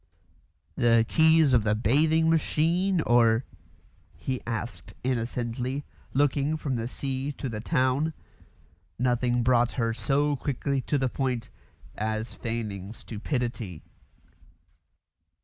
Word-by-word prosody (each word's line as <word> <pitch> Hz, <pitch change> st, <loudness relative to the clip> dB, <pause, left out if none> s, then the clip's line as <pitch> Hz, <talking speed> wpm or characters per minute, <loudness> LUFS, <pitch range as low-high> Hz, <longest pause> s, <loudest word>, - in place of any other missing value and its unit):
"The 115 Hz, -1 st, +4 dB
keys 160 Hz, -2 st, +5 dB
of 120 Hz, -4 st, +4 dB
the 105 Hz, 0 st, +2 dB
bathing 155 Hz, +9 st, +3 dB
machine, 165 Hz, +3 st, +2 dB
or 120 Hz, -2 st, +4 dB, 0.3 s
?" -, -, -34 dB
he 130 Hz, -2 st, -1 dB
asked 115 Hz, +1 st, -5 dB
innocently, 125 Hz, +2 st, -2 dB, 0.3 s
looking 145 Hz, +2 st, +1 dB
from 140 Hz, -4 st, -2 dB
the 115 Hz, 0 st, -2 dB
sea 135 Hz, +2 st, -3 dB
to 135 Hz, -, -5 dB
the 110 Hz, -3 st, -4 dB
town. 140 Hz, +3 st, +1 dB, 0.8 s
Nothing 125 Hz, 0 st, +1 dB
brought 120 Hz, -1 st, +3 dB
her 115 Hz, -3 st, 0 dB
so 145 Hz, +4 st, +1 dB
quickly 140 Hz, 0 st, -1 dB
to 145 Hz, -, +2 dB
the 130 Hz, -1 st, +1 dB
point 125 Hz, -2 st, -2 dB, 0.5 s
as 110 Hz, +1 st, -2 dB
feigning 110 Hz, -3 st, -4 dB
stupidity. 115 Hz, -, -4 dB
125 Hz, 115 wpm, -27 LUFS, 115-145 Hz, 0.8 s, keys